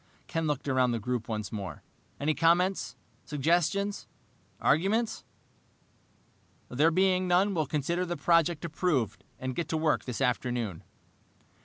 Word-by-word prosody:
Ken 165 Hz, -1 st, -2 dB
looked 145 Hz, -1 st, -2 dB
around 130 Hz, -2 st, +3 dB
the -, -, 0 dB
group 120 Hz, +1 st, -3 dB
once 105 Hz, -3 st, -4 dB
more. 100 Hz, -4 st, -6 dB, 0.4 s
"Any 150 Hz, +2 st, +1 dB
comments, 175 Hz, +4 st, +2 dB, 0.3 s
suggestions, 175 Hz, +7 st, 0 dB, 0.5 s
arguments? 210 Hz, +9 st, +1 dB, 1.5 s
There 150 Hz, +6 st, +3 dB
being 185 Hz, +1 st, +2 dB
none, 185 Hz, +3 st, +3 dB
we'll 155 Hz, -5 st, 0 dB
consider 165 Hz, +5 st, -1 dB
the 175 Hz, -1 st, -3 dB
project 170 Hz, -1 st, +2 dB
approved, 150 Hz, -, -1 dB
and 130 Hz, 0 st, -4 dB
get 170 Hz, -, -3 dB
to 160 Hz, -, 0 dB
work 155 Hz, -1 st, +1 dB
this 125 Hz, -3 st, -4 dB
afternoon." 120 Hz, -7 st, -1 dB
155 Hz, 130 wpm, -29 LUFS, 130-175 Hz, 1.5 s, around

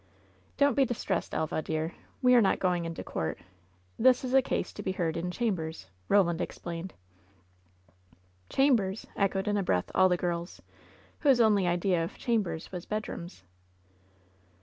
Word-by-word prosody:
"Don't 285 Hz, 0 st, +4 dB
be 275 Hz, -, +4 dB
distressed, 245 Hz, -3 st, -2 dB
Elva, 155 Hz, 0 st, -1 dB
dear! 160 Hz, +1 st, -3 dB, 0.3 s
We 250 Hz, 0 st, +6 dB
are 245 Hz, -, +7 dB
not 195 Hz, -, +3 dB
going 180 Hz, -2 st, 0 dB
into 165 Hz, 0 st, -5 dB
court. 80 Hz, -1 st, -3 dB, 0.6 s
This 255 Hz, +2 st, +5 dB
is 255 Hz, 0 st, -3 dB
a 270 Hz, -, +7 dB
case -, -, -2 dB
to -, -, -7 dB
be 190 Hz, -2 st, -2 dB
heard 170 Hz, -3 st, -1 dB
in 170 Hz, +2 st, -2 dB
chambers," 180 Hz, -, -3 dB, 0.2 s
Roland 180 Hz, -4 st, +3 dB
explained. 170 Hz, +1 st, -6 dB, 1.5 s
"Chambers 225 Hz, -8 st, +2 dB
!" -, -, -29 dB
echoed, 195 Hz, 0 st, -2 dB
in 205 Hz, 0 st, +1 dB
a 200 Hz, -, 0 dB
breath, 90 Hz, -, 0 dB
all 185 Hz, 0 st, +5 dB
the 180 Hz, -, +2 dB
girls, 175 Hz, 0 st, -3 dB, 0.6 s
whose 275 Hz, -5 st, +4 dB
only 210 Hz, -5 st, +4 dB
idea 175 Hz, 0 st, +1 dB
of 165 Hz, -, -6 dB
chambers 210 Hz, -9 st, -1 dB
was 180 Hz, -2 st, -7 dB
bedrooms. 180 Hz, -, -5 dB
185 Hz, 155 wpm, -29 LUFS, 170-220 Hz, 1.5 s, are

